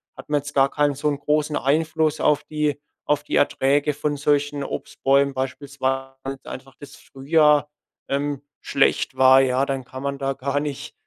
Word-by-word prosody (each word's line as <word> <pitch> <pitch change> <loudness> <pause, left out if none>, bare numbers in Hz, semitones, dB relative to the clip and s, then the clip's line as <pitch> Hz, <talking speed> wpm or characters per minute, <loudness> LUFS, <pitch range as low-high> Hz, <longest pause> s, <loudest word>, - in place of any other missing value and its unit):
hat - - -12
man 145 -1 +2
jetzt 145 +1 -9
gar 135 0 +4
keinen 145 -1 +1
so 150 +2 -2
'n 145 -1 -3
großen 150 +1 0
Einfluss 155 +2 +1
auf 150 -1 +2
die 150 -2 -2 0.3
auf 150 0 +1
die - - -3
Erträge 145 +2 +2
von 145 0 -2
solchen 145 0 0
Obstbäumen 140 0 0
beispielsweise, 135 0 -3
weil 135 0 -5
einfach 135 +1 -10
das 145 -1 -12
Frühjahr, 150 +1 +2 0.4
ähm, 140 0 -1 0.2
schlecht - - +1
war, 130 0 +7
ja. 130 +1 +1
Dann 135 -2 -3
kann 130 +2 -9
man 140 0 -2
da 135 0 -2
gar 140 +2 -2
nicht 145 0 -5
140 Hz, 175 wpm, -23 LUFS, 135-150 Hz, 0.4 s, war